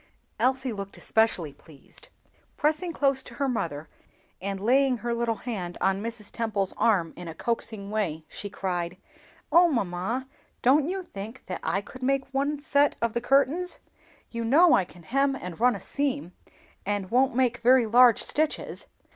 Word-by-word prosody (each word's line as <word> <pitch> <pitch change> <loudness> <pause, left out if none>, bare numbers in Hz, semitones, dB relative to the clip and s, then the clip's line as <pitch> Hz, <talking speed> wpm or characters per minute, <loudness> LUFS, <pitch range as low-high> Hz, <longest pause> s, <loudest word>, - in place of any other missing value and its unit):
Elsie 260 -1 +2
looked 200 -1 -7
especially 190 -9 +1
pleased. 160 - -16 0.5
Pressing 310 +4 0
close 275 -4 +1
to - - -11
her 280 - 0
mother, 160 - -3 0.5
and 195 0 -3
laying 255 +4 +3
her 235 +2 -2
little 235 -1 0
hand 195 -8 -5
on 195 +1 +1
Mrs. 225 -2 -6
Temple's 210 -5 -1
arm 180 -8 +2
in 175 0 -8
a 165 - -7
coaxing 220 -1 -3
way, 165 -8 -2
she 205 - -7
cried, 180 -2 -3 0.5
"Oh, 345 0 +6
mamma, 225 +3 -2 0.4
don't 280 +5 +4
you 380 0 -3
think 220 - -9
that 185 - -5
I 195 - 0
could 255 +5 -13
make 270 +1 +1
one 285 +2 0
set 285 -1 +2
of 230 -1 0
the 235 - -1
curtains? 280 +8 +2 0.5
You 230 -1 -3
know 305 +10 +6
that - - +6
I 185 - +1
can 175 -1 -16
hem 275 - +1
and 180 -9 -7
run 245 0 +4
a - - -6
seam, 280 -1 -2 0.5
and 200 -1 -2
don't 255 0 +3
make 250 -2 +2
very 250 0 +5
large 240 +1 +6
stitches. 310 0 -1
235 Hz, 170 wpm, -27 LUFS, 195-270 Hz, 0.5 s, Oh